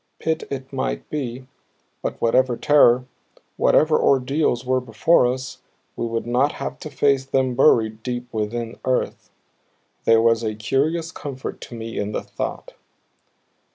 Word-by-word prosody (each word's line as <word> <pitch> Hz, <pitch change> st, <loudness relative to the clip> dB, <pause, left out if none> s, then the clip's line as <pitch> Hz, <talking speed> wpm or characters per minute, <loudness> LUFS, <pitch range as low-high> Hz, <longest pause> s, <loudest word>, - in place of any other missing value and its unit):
Pit 160 Hz, 0 st, -2 dB
it 135 Hz, 0 st, -6 dB
might 135 Hz, -, -3 dB
be, 130 Hz, -3 st, -4 dB, 0.6 s
but -, -, -4 dB
whatever 125 Hz, +1 st, +2 dB
terror, 125 Hz, -4 st, +5 dB, 0.5 s
whatever 155 Hz, 0 st, +3 dB
ordeals 135 Hz, -1 st, +2 dB
were 130 Hz, 0 st, +1 dB
before 125 Hz, +4 st, +3 dB
us, 130 Hz, 0 st, -6 dB, 0.4 s
we 115 Hz, -, -2 dB
would 115 Hz, 0 st, -3 dB
not 125 Hz, +5 st, +1 dB
have -, -, -5 dB
to 155 Hz, -, -7 dB
face 140 Hz, -1 st, +2 dB
them 130 Hz, -1 st, 0 dB
buried 110 Hz, -4 st, +3 dB
deep 125 Hz, 0 st, -4 dB
within 115 Hz, +2 st, -3 dB
earth. 130 Hz, -1 st, -1 dB, 0.8 s
There 115 Hz, 0 st, +5 dB
was 115 Hz, 0 st, +3 dB
a 110 Hz, -2 st, -2 dB
curious 150 Hz, +9 st, 0 dB
comfort 140 Hz, -4 st, -7 dB
to 120 Hz, -, -9 dB
me 115 Hz, 0 st, -5 dB
in 105 Hz, +1 st, -3 dB
the -, -, -2 dB
thought. -, -, -5 dB
125 Hz, 145 wpm, -22 LUFS, 115-135 Hz, 0.8 s, terror